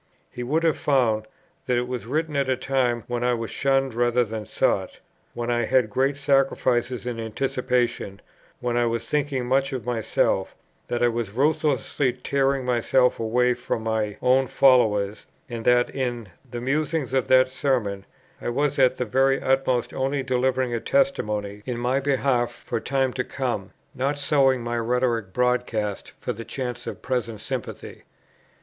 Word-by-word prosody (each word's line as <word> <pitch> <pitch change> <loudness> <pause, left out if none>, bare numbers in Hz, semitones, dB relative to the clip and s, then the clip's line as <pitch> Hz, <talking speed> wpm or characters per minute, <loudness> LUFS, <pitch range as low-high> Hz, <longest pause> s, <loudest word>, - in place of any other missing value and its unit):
He 125 - -7
would 150 +7 0
have 160 -2 +2
found, 115 -6 +2 0.4
that 125 - +2
it 125 0 -1
was 125 -2 -5
written 155 +3 -1
at 140 -1 +1
a 130 - +2
time 125 -4 0
when 120 0 -3
I 125 0 +2
was 115 -1 -5
shunned 135 -1 +1
rather 120 +1 +2
than 110 -2 -6
sought, - - 0 0.4
when 120 0 -2
I 120 -1 +1
had 120 -2 +2
great 135 +4 +1
sacrifices 130 -3 +1
in 120 -2 -3
anticipation, 120 -3 -1 0.4
when 120 -1 -1
I 120 0 +2
was 115 0 -2
thinking 140 -2 -1
much 135 +2 +1
of 125 -4 -4
myself; 120 -3 0 0.3
that 120 0 -1
I - - +6
was 115 -4 -2
ruthlessly 145 -1 +1
tearing 135 +1 0
myself 125 +1 +2
away 125 +2 +2
from 120 -2 -3
my 110 -2 -1
own 130 +1 +4
followers, 105 -6 +3 0.2
and 115 -3 -6
that, 125 0 +3
in 120 -6 -3 0.2
the 120 0 -5
musings 145 +1 -1
of 130 -1 +1
that 130 0 +5
Sermon, 120 -8 -1 0.4
I - - -2
was 140 +3 0
at 130 -1 +5
the 125 - -1
very 135 +4 +2
utmost 130 -2 +1
only 135 +1 -1
delivering 130 -1 0
a 115 - 0
testimony 105 - 0
in 125 -2 -2
my 125 +3 +1
behalf 135 -3 +1
for - - -4
time 135 +1 0
to 125 - -1
come, 125 -8 -3 0.2
not 140 +3 -1
sowing 135 -3 +2
my 120 0 -2
rhetoric 115 -3 0
broadcast 120 -3 -1
for - - -3
the 115 - -7
chance 125 -1 -5
of - - -6
present 120 -4 -2
sympathy. - - -6
125 Hz, 165 wpm, -24 LUFS, 120-135 Hz, 0.4 s, I